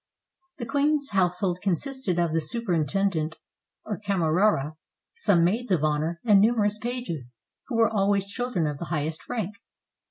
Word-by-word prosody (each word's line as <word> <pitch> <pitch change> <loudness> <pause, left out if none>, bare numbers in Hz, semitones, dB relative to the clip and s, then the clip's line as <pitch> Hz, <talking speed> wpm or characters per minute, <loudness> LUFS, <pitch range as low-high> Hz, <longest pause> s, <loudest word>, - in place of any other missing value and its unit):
The 240 - -4
queen's 285 +1 +1
household 180 -1 +1
consisted 205 - -1
of 170 -2 +1
the 165 - +2
superintend 195 - 0
ent, 160 +1 -2 0.5
or 210 -3 -4
camerara, 180 -5 +1 0.4
some 200 - +3
maids 225 +8 0
of 175 -6 +2
honor, 155 +2 0
and 205 -4 +6
numerous 210 -1 +2
pages, 170 - -5 0.3
who 250 - -3
were 225 0 +5
always 200 -1 +2
children 205 -4 -2
of 150 -2 -3
the - - -4
highest 155 -1 -3
rank. 210 -3 -3
195 Hz, 150 wpm, -26 LUFS, 165-225 Hz, 0.5 s, and